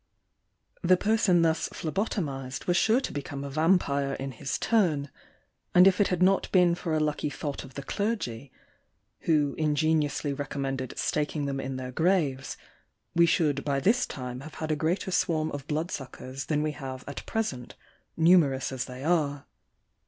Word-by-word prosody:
The 185 0 +4
person 205 -4 +3
thus 160 -1 +1
phlebotomised 150 - -3
was 175 - +2
sure 225 +7 +4
to - - -4
become 140 0 -5
a 140 - -6
Vampyre 140 -3 +2
in 135 0 -5
his 130 +2 -3
turn; 165 - +1 0.6
and 180 +1 +8
if 195 0 +5
it 205 - +4
had 180 -1 +1
not 195 +1 +3
been 180 -2 +5
for 170 -2 -2
a - - +2
lucky 150 -1 0
thought 145 0 -5
of 135 -1 -13
the 140 - -5
clergy, 140 - -3 0.7
who 150 -4 +2
ingeniously 150 -1 +1
recommended 135 -2 -4
staking 150 -1 -1
them 135 -1 -2
in 135 0 -4
their 130 -1 -5
graves, 155 -4 0 0.6
we 170 0 +5
should 150 -5 +1
by 140 -2 0
this 230 - +2
time 125 -2 -6
have 155 +3 -10
had 155 -1 -3
a - - +2
greater 165 +5 -1
swarm 160 -3 +1
of 145 0 -6
blood 160 +4 -2
suck 135 -2 -6
ers 130 +1 -6
than 150 -1 +1
we 155 - 0
have 130 -2 -7
at 140 - -6
present, 135 - -3 0.4
numerous 160 -6 +4
as 130 -1 -3
they 125 +1 -8
are. 150 -4 +1
150 Hz, 170 wpm, -28 LUFS, 135-175 Hz, 0.7 s, and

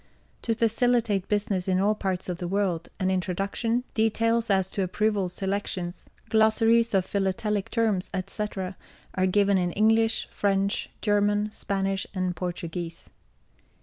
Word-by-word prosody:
To 230 - 0
facilitate 230 -3 +2
business 200 -3 0
in 185 -1 +2
all 205 +2 +3
parts 190 -3 -3
of 180 -1 -4
the 175 - -3
world, 185 -3 -1
an 190 -1 +1
Introduction, 195 +6 -1
Details 230 +1 +1
as 190 -2 +3
to 200 - -2
Approval 200 0 0
Selections, 190 -1 -3 0.2
Glossaries 225 +1 +4
of 190 -1 +3
Philatelic 200 +1 -1
Terms, 220 -6 0
etc., 190 0 -4 0.4
are 185 0 +1
given 200 0 +3
in 175 -1 0
English, 225 +1 +3
French, 200 0 0
German, 205 0 +2
Spanish, 195 -2 -2
and 185 -1 -1
Portuguese. 170 -1 -5
200 Hz, 130 wpm, -26 LUFS, 185-220 Hz, 0.4 s, Glossaries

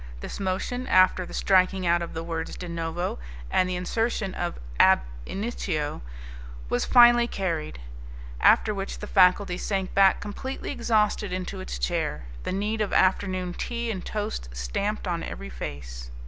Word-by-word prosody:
This - - -6
motion, 200 +7 -2
after 185 -1 +4
the - - -10
striking 190 -1 +3
out 170 0 +3
of 170 - -6
the 165 - -3
words 165 -1 -4
de 180 - -6
novo 170 - -3 0.3
and 185 - +2
the 180 - -1
insertion 195 +2 -1
of 175 0 -3 0.2
ab - - +6 0.3
initio, 190 - -3 0.7
was 120 - 0
finally 240 -1 +7
carried, 165 - -3 0.6
after 215 - +5
which 195 -1 -4
the - - -7
faculty 185 -1 +4
sank 195 -2 -2
back 195 -1 +5
completely 260 +6 -5
exhausted 215 -5 +1
into 185 +1 -4
its 185 - -5
chair, 65 +4 -1 0.2
the - - -4
need 210 +3 -1
of 210 - -1
afternoon 185 -1 +1
tea 235 +3 -3
and 190 -4 -5
toast 205 - -4
stamped 200 - -2
on 170 -2 -1
every 65 - -7
face. 60 -1 -7
185 Hz, 155 wpm, -26 LUFS, 170-210 Hz, 0.7 s, finally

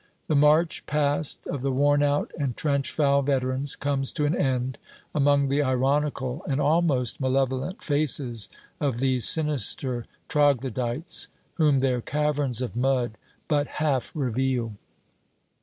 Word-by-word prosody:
The 155 - 0
march 150 +3 +3
past 145 0 0
of 140 - -4
the 135 +1 -1
worn 145 +2 +2
out 145 0 0
and 135 -5 -2
trench 140 -3 0
foul 140 -2 +2
veterans 135 0 -1
comes 140 -2 -1
to 150 - 0
an 150 +3 +1
end 130 -2 -1 0.3
among 140 -1 +3
the 140 +2 +1
ironical 135 0 0
and 135 0 0
almost 145 -6 +1
malevolent 130 - -1
faces 135 - +1 0.3
of 140 -5 -1
these 130 -1 +4
sinister 135 -5 +1 0.2
troglodytes, 130 - 0 0.3
whom 150 -4 +3
their 130 -2 +1
caverns 145 -3 -1
of 115 -4 -5
mud 125 -2 0 0.3
but 145 -2 +1
half 140 -6 0
reveal. 130 -4 -1
140 Hz, 130 wpm, -25 LUFS, 130-145 Hz, 0.3 s, these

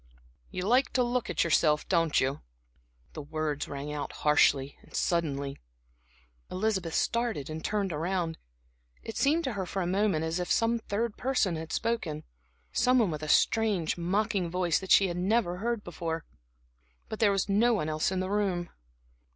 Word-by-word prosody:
"You 185 -2 -4
like 250 +3 +3
to 250 - +3
look 245 0 -1
at - - +1
yourself, 150 -2 +2
don't 165 -4 +2
you?" 135 +2 -1 0.7
The - - -6
words 155 0 -3
rang 145 +1 -5
out 145 -1 -4
harshly, 140 -2 +4 0.2
suddenly. 140 -5 -1 0.9
Elizabeth 190 -4 -1
started 230 - 0
and 160 +1 -6
turned 200 -4 -1
around. 165 +1 -2 0.6
It 225 - -7
seemed 310 +4 +2
to 260 - -2
her 190 -3 -3
for 190 +2 -2
a - - -2
moment 185 -3 +1
as 165 +2 -2
if 180 - -2
some 230 0 +2
third 220 +1 -2
person 245 -9 +1
had 160 0 -6
spoken 220 -10 -2 0.5
some 255 +1 +3
one 220 -8 +3
with 155 -1 -4
a 155 - -5
strange, 205 -7 +2
mocking 185 +1 0
voice 175 -2 +1
that 190 - -9
she 195 - +6
had 175 -1 -4
never 185 -1 +1
heard 230 +1 -2
before. 165 -1 -4 0.8
But 220 - -6
there 210 -3 +4
was 195 0 0
no 225 +4 +3
one 155 -7 -1
else 155 +3 0
in 185 -1 -1
the 185 +1 -3
room. 190 -4 -1
185 Hz, 170 wpm, -29 LUFS, 160-220 Hz, 0.9 s, she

